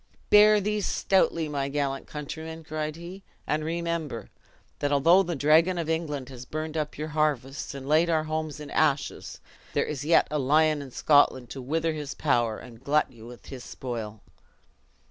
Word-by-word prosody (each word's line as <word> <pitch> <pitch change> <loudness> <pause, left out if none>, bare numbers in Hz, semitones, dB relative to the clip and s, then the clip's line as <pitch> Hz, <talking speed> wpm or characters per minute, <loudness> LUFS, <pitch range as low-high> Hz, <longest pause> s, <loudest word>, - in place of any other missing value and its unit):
"Bear 210 0 +7
these 210 0 -1
stoutly 170 -4 +2
my 140 -2 -2
gallant 140 -1 -2
countrymen," 160 +2 -7
cried 155 -1 -4
he, 175 +4 -9 0.2
"and 155 +1 -1
remember, 165 -5 -3 0.5
that 145 - 0
although 165 +7 +5
the 175 -3 -2
dragon 160 +6 +4
of 165 -2 -2
England 150 -5 -2
has 125 -2 -9
burned 155 +4 -5
up 150 -1 -3
your 155 +1 -4
harvests, 145 -3 -1
and 135 -1 -7
laid 160 +3 +3
our 160 -2 +2
homes 155 -1 -3
in 150 -1 -8
ashes, 140 -1 0 0.3
there - - +1
is 145 -2 -4
yet 165 +3 +4
a 150 - 0
lion 155 +2 +3
in 140 - -8
Scotland 130 -3 +3
to 135 - -6
wither 160 +5 -1
his 150 -2 -5
power, 120 -6 +1
and 120 0 -13
glut 150 +2 +2
you 115 -2 -13
with 120 0 -12
his 130 -2 -8
spoil!" 110 -4 -6
150 Hz, 175 wpm, -27 LUFS, 135-160 Hz, 0.5 s, Bear